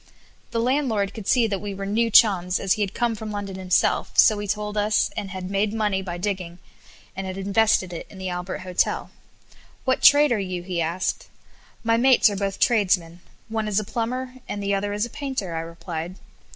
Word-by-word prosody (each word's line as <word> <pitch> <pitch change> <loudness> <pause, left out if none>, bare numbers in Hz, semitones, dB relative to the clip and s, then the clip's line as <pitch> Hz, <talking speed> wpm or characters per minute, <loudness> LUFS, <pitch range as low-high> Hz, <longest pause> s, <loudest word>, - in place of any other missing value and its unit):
The 230 - -2
landlord 230 -6 0
could 215 -3 -8
see 245 -3 +4
that 200 -4 -2
we 205 -1 -5
were 195 0 -5
new 225 +4 +1
chums, 190 -5 +4
as 195 - +2
he 215 - -3
had 200 -1 -2
come 240 -1 +1
from 220 0 -6
London 205 -2 -5
himself, 185 -1 +1
so 215 -2 +6
he 205 - -4
told 210 +1 -2
us, 210 +1 +1
and 195 - -4
had 185 0 -6
made 205 +2 0
money 210 -3 0
by 175 -2 -5
digging, 180 -2 -3 0.6
and 190 0 -4
had 185 0 -5
invested 195 -1 +2
it 165 - -7
in 195 - -13
the 190 0 -5
Albert 180 +1 -4
Hotel. 185 -1 -1 0.7
"What 260 0 +1
trade 290 -1 +7
are 230 - +2
you?" 185 -2 -4
he 180 -2 -2
asked. 170 +3 -2 0.6
"My 230 0 +2
mates 250 -3 +5
are - - -3
both 195 0 -3
tradesmen 185 -7 +2 0.3
one 220 -1 -2
is 210 -1 +1
a - - -3
plumber, 250 +4 -3 0.2
and 205 - -4
the 200 0 0
other 200 +1 -1
is 210 +2 -1
a - - -8
painter," 265 - -4
I - - -1
replied. 165 +1 -6
200 Hz, 205 wpm, -24 LUFS, 185-220 Hz, 0.7 s, trade